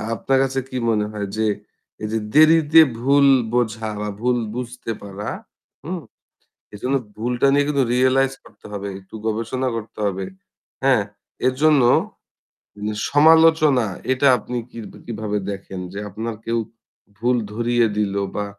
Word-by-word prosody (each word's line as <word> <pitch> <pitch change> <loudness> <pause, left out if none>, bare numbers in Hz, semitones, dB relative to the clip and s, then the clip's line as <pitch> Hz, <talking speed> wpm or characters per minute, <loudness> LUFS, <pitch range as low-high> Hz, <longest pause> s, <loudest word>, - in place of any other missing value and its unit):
আপনার 135 +6 +1
কাছে 135 0 -1
কি 130 - -4
মনে 105 -2 +1
হয় 105 -2 -4
যে 110 - +1 0.6
এই - - -1
যে 110 - 0
দেরিতে 155 +1 +7 0.2
ভুল 140 +2 +4 0.3
বোঝা 110 -2 0
বা 105 - -3
ভুল 125 0 +2 0.2
বুঝতে 125 -1 -5
পারা। 100 +1 -6 0.6
হুম? 175 +2 -4 0.7
এজন্য 130 +6 -1 0.2
ভুলটা 120 +4 0
নিয়ে 145 0 +3
কিন্তু 140 -3 +2
রিয়ালাইজ 130 +1 +3
করতে - - -16
হবে। 100 0 -4
একটু 95 +2 -20
গবেষণা 115 +4 -1
করতে 115 -1 -8
হবে। 95 -1 -2 0.6
হ্যাঁ 130 -6 +4 0.4
এর 130 - +2
জন্য 150 -3 +5 1.0
নিঃ 105 0 -2
সমালোচনা 155 -3 +5 0.3
এটা 135 +2 +2
আপনি 125 +3 -5
কি - - -9 0.3
কিভাবে 110 -2 -3
দেখেন 95 -1 -7
যে 100 - -5
আপনার 110 +3 -5
কেউ 115 0 0 0.6
ভুল 120 +3 +1 0.2
ধরিয়ে 120 +1 +2
দিলো 100 -1 0
বা 105 - -1
120 Hz, 140 wpm, -21 LUFS, 105-135 Hz, 1.0 s, দেরিতে